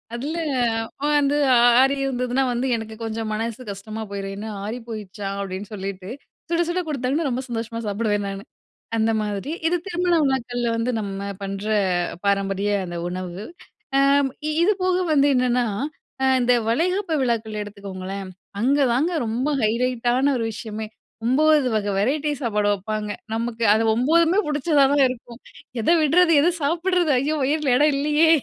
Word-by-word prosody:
அதுல 290 +7 -4 0.8
வந்து 290 0 +3 0.5
ஆறி 270 +1 +3
இருந்ததுனா 250 0 0
வந்து 250 +3 -1
எனக்கு 220 -1 -6
கொஞ்சம் 225 0 -3
மனசு 225 +3 -3
கஷ்டமா 215 +3 -7
போயிரும். 195 -1 -4
என்ன 215 +2 -6 0.2
ஆறி 215 +4 -4
போயிடுச்சா 210 -3 -6
அப்டின்னு 195 +1 -5
சொல்லிட்டு 195 -1 -6 0.4
சுட, 340 0 +2
சுட 345 +1 -1
குடுத்தாங்கன்னா, 285 +1 -1
ரொம்ப 250 +1 -2
சந்தோஷமா 230 -1 -4
சாப்பிடுவேன் 205 0 0
நானு. 195 0 -5 0.5
அந்த 225 0 +2
மாதிரி 210 +5 -3 0.2
இது 345 +2 +2
திருமண 355 -1 +1
விழாக்கள்ல 245 -3 0
வந்து 230 +2 0
நம்ம 200 -1 -4
பண்ற 195 +1 -4 0.6
பாரம்பரிய 195 0 +1
அந்த 175 -1 -6
உணவு. 185 +1 -5 0.5
ஆ - - +5 0.6
இது 410 - +4
போக 370 -1 +2 0.2
வந்து 285 -1 +4
என்னன்னா 250 -1 +2 0.6
அ - - +3 0.2
இந்த 245 0 +4
வளைகாப்பு 350 - 0
விழாக்கள் 225 -4 -1
எடுத்துக்கோங்களேன், 195 -1 -7 0.3
அங்க 270 +5 +3
தாங்க 305 +9 +1
ரொம்ப 245 +6 -1
ஹைலைட்டான 245 +4 +1
ஒரு 230 - -1
விஷயமே 215 0 -6 0.4
9 295 +2 +4
வகை 205 -1 -1
வெரைட்டி 285 +8 +1
சாப்பாடு 210 -3 +1
வெப்பாங்க, 210 +2 -4 0.3
நமக்கு 230 0 -2
அது 220 - +2
9மே 330 - +3
பிடிச்சதா 295 -1 +3
தான் 285 -1 +5
இருக்கும். 245 -1 -8 0.4
எத 220 - -2
விட்றது 330 +3 +4
எத 340 - +4
சாப்பிடுறது 345 +1 +1
ஐயோ! 290 +4 0
வயில 285 -2 +1
இடம் 295 +2 +4
இல்லயே. 300 +3 +3
240 Hz, 145 wpm, -23 LUFS, 210-290 Hz, 0.8 s, ஆ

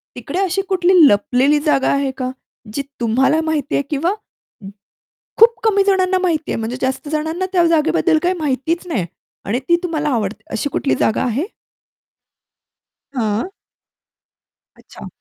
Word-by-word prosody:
तिकडे 280 +9 -4
अशी 390 0 0
कुठली 370 -1 +2
लपलेली 255 +8 +3
जागा 275 -3 +2
आहे 275 -1 0
का? 255 -1 -3 0.4
जी 280 - -1 0.2
तुम्हाला 265 +7 +2
माहिती 310 -2 -1
आहे 280 - +1
किंवा 325 +6 0 1.3
खूप 460 -1 +6
कमी 405 -3 +3
जणांना 375 -1 +2
माहिती 325 -4 -1
आहे. - - -1
म्हणजे 230 +3 -4
जास्त 265 +3 -2
जणांना 320 +4 -2
त्या 350 -2 +4
जागेबद्दल 325 +1 +2
काही 360 +1 +2
माहितीच 310 +5 -1
नाही 215 - -1 0.4
आणि 230 +6 -1
ती 340 - +6
तुम्हाला 310 -4 -1
आवडते 220 -5 -2
अशी 285 - -2
कुठली 275 - 0
जागा 220 - +1
आहे? 260 - -1 1.7
हां. 230 - -1 1.2
अच्छा. - - -13
300 Hz, 140 wpm, -18 LUFS, 255-350 Hz, 1.7 s, खूप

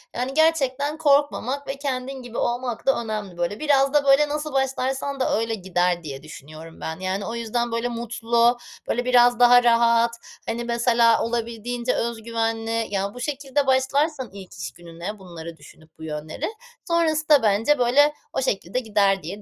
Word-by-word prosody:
yani, 250 +2 -2
gerçekten 295 -2 +1
korkmamak 285 -2 +1
ve 270 - -4
kendin 265 -1 -4
gibi 245 -2 -9
olmak 240 -1 -2
da 270 -3 +2
önemli 210 -5 -5
böyle. 175 +4 -2
Biraz 275 -2 +2
da 295 -1 +3
böyle 280 +2 +5
nasıl 300 0 -3
başlarsan 270 +1 -1
da 255 - +1
öyle 225 0 -1
gider 180 -3 0
diye 140 -3 -7
düşünüyorum 155 +2 -12
ben, 160 +1 -5
yani, 190 +2 -2
o 230 - -4
yüzden 235 +1 -2
böyle 230 +1 -1
mutlu, 235 0 +1 0.3
böyle 245 +1 0
biraz 245 -1 +4
daha 245 0 +7
rahat, 235 0 +4 0.4
hani, 235 +1 -2
mesela, 235 -1 +3
olabildiğince 235 +1 -2
öz 230 -1 -3
güvenli 225 0 -1
ya 200 0 -2
bu 250 - -10
şekilde 275 +1 -2
başlarsan 265 +1 +1
ilk 195 -2 -11
iş 170 - -6
gününe 175 +4 -8
bunları 170 -3 -9
düşünüp 160 0 -17
bu - - -10
yönleri, 155 0 -5 0.4
sonrasında 310 -4 +3
bence, 225 +7 +2
böyle, 280 +5 +4 0.2
o - - -1
şekilde 210 -3 -1
gider 200 -5 +1
diye 195 +6 -7
235 Hz, 165 wpm, -23 LUFS, 205-270 Hz, 0.4 s, daha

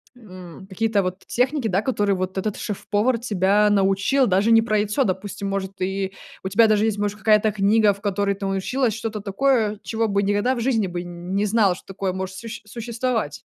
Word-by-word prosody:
м, 185 -5 -12
какие-то 205 +1 0
вот 185 +1 -4
техники, 255 0 0
да, 195 +1 +1
которые 205 -6 0
вот 185 +1 -4
этот 210 +2 -2
шеф-повар 210 +3 -1
тебя 210 -2 +2
научил, 200 +7 +2
даже 200 +4 +2
не 225 0 +7
про 215 -2 +1
яйцо, 210 +7 +1
допустим, 200 0 -3
может, 195 0 -4
и 190 +1 -2 0.3
у 190 - -3
тебя 220 +3 +5
даже 215 0 +3
есть, 215 -2 0
может, 205 0 -2
какая-то 215 +1 +3
книга, 205 +1 +3
в 200 - -16
которой 200 -1 0
ты 200 0 -6
научилась 215 +5 0
что-то 220 -3 -4
такое, 215 0 +1
чего 225 0 -1
бы 200 0 +1
никогда 205 +6 +1
в - - -4
жизни 225 -6 +1
бы 175 0 -4
не 175 +4 -3
знала, 205 -4 +3
что - - -15
такое 195 -1 -3
может 190 0 -5
сущь 230 +2 -8
существовать. 230 - -3
205 Hz, 195 wpm, -22 LUFS, 195-225 Hz, 0.3 s, не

